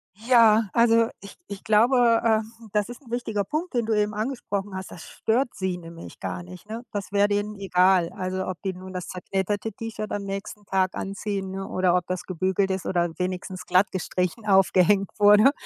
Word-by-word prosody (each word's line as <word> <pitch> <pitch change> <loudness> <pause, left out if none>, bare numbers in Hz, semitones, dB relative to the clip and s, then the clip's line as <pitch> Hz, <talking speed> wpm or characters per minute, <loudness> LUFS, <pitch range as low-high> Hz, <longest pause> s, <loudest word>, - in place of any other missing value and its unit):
Ja, 225 0 +5
also, 230 -1 +4
ich 200 - -11
ich 200 -1 -8
glaube, 230 +2 +4
ähm, 225 0 -1
das 210 +1 +1
ist 245 +3 -9
'n 235 - -15
wichtiger 220 -4 -1
Punkt, 310 - -3
den 235 -2 +1
du 225 - 0
eben 210 0 +1
angesprochen 205 -4 -3
hast. 190 0 -6
Das 175 - -10
stört 240 +3 0
sie 190 -2 -2
nämlich 170 -1 -11
gar 175 - -4
nicht, 180 +3 -12
ne? 230 +3 -5
Das 200 -1 -5
wäre 205 0 +3
denen 205 +1 -1
egal, 185 -2 +3
also, 185 0 -3
ob 185 -2 -5
die 190 -1 -1
nun 185 +1 -10
das 180 -2 -5
zerknitterte 195 +4 -2
T-Shirt 215 0 -6
am 205 -1 -2
nächsten 200 +1 -6
Tag 190 -1 0
anziehen, 195 -1 -4
ne, 195 0 -5
oder 185 -1 +2
ob 180 -1 +1
das 185 0 -3
gebügelt 190 +2 0
ist 190 -1 -3
oder 175 -2 +1
wenigstens 185 0 -4
glatt 185 +2 +3
gestrichen 185 +3 -2
aufgehängt 195 0 +4
wurde, 210 +5 +7
200 Hz, 190 wpm, -25 LUFS, 185-220 Hz, -, wurde